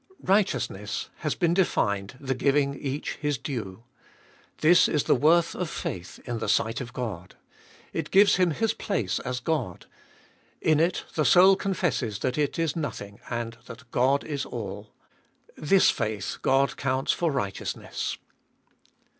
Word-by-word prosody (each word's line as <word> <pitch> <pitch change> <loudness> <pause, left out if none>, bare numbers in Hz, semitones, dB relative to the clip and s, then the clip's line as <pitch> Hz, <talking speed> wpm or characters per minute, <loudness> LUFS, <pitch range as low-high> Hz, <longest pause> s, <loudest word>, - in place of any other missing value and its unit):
Righteous 195 +1 +2
ness - - -6
has - - -2
been 170 -2 +2
defined 100 - 0
the 135 -1 -2
giving 140 +2 +2
each 140 +1 -4
his 150 -2 -1
due. 115 -6 -6 0.8
This 170 +2 +6
is 150 -3 +1
the - - +3
worth 165 +6 +3
of 180 -3 -3
faith 90 - -5
in 120 -2 -3
the - - -3
sight 115 +4 +1
of 120 -1 -7
God: 105 -8 -6 0.6
it - - -3
gives 200 +1 +5
Him 180 -2 +3
His 225 +7 0
place 115 - -2
as 125 0 -3
God, 125 - -2 0.7
in 155 -1 +3
it 170 +3 +1
the 155 - +1
soul 190 +4 +7
confesses 175 - -1
that 130 +3 -1
it 145 -2 0
is 165 -3 0
nothing, 110 -10 -5
and 115 -1 -4
that 120 +1 -12
God 135 +3 +2
is 145 -4 -3
all. 105 -2 -7 0.6
This 185 +6 +4
faith 105 -3 -3
God 135 +1 +2
counts 130 0 0
for 170 -2 0
righteousness. 100 -9 -3
135 Hz, 150 wpm, -26 LUFS, 115-165 Hz, 0.8 s, soul